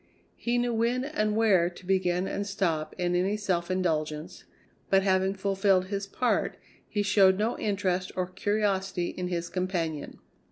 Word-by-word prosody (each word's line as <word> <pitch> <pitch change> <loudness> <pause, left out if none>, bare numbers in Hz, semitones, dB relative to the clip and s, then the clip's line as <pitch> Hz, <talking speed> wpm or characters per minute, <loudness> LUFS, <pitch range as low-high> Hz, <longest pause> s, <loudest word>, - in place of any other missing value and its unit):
He 240 +1 -1
knew 240 0 +1
when 235 +3 +1
and 215 -8 0
where 195 -6 +4
to 180 +1 -14
begin 185 -1 +1
and 200 0 -3
stop 170 -6 -1
in 175 0 0
any 190 +4 +1
self 185 -4 -1
indulgence, 155 -4 -2 0.4
but 195 0 +4
having 190 0 +2
fulfilled 195 -1 +2
his 200 -1 -3
part 245 +5 0 0.3
he 205 -2 0
showed 195 -2 +5
no 220 +4 0
interest 190 -3 -1
or 185 - 0
curiosity 195 -2 -1
in 180 -1 -4
his 175 -1 -2
companion. 175 -5 -3
190 Hz, 155 wpm, -28 LUFS, 180-205 Hz, 0.4 s, showed